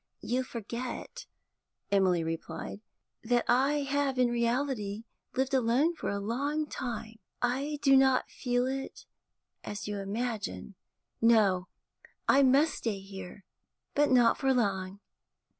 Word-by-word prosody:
'You 250 +2 0
forget,' 240 0 -6 0.6
Emily 185 -4 +3
replied, 165 +5 -5 0.4
'that 240 +1 +1
I 265 +4 +3
have 280 -1 0
in 250 -1 +4
reality 235 -3 -1 0.3
lived 265 +1 0
alone 260 +6 +3
for 325 - -4
a 200 - -1
long 280 +9 -1
time; 230 -5 -5 0.2
I 275 +5 -1
do 270 -1 +6
not 265 -1 +4
feel 245 -1 0
it 270 +1 -5 0.6
as 205 0 -6
you 205 -1 -3
imagine. 210 0 -4 0.5
No, 205 -6 +4 0.6
I 275 - +6
must 275 +4 +4
stay 220 -4 -2
here, 195 0 -10 0.5
but 295 0 +3
not 245 -3 +4
for 270 -1 +2
long. 195 -4 -1
240 Hz, 125 wpm, -30 LUFS, 205-270 Hz, 0.6 s, do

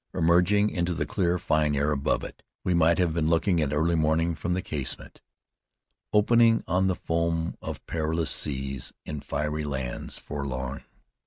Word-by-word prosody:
Emerging 90 +5 +3
into 85 -1 -1
the - - -1
clear, 90 -3 0
fine 75 -4 +1
air 70 +2 +1
above 70 -2 0
it, - - -9 0.2
we 90 - +1
might 85 -1 +4
have 90 -3 +1
been 80 -1 +1
looking 85 +1 +2
at 70 -2 0
early 80 +3 +1
morning 80 +1 +2
from 90 +2 -2
the 95 - -1
casement 70 -4 -4 0.9
"opening 115 +2 +4
on 90 +2 +2
the 95 - +1
foam 85 0 -1
Of - - -7
perilous 80 -1 0
seas, 65 -2 -1
in 75 -1 -5
faëry 75 +1 -2
lands 65 -4 -4
forlorn." 65 -2 -5
80 Hz, 160 wpm, -27 LUFS, 75-90 Hz, 0.9 s, might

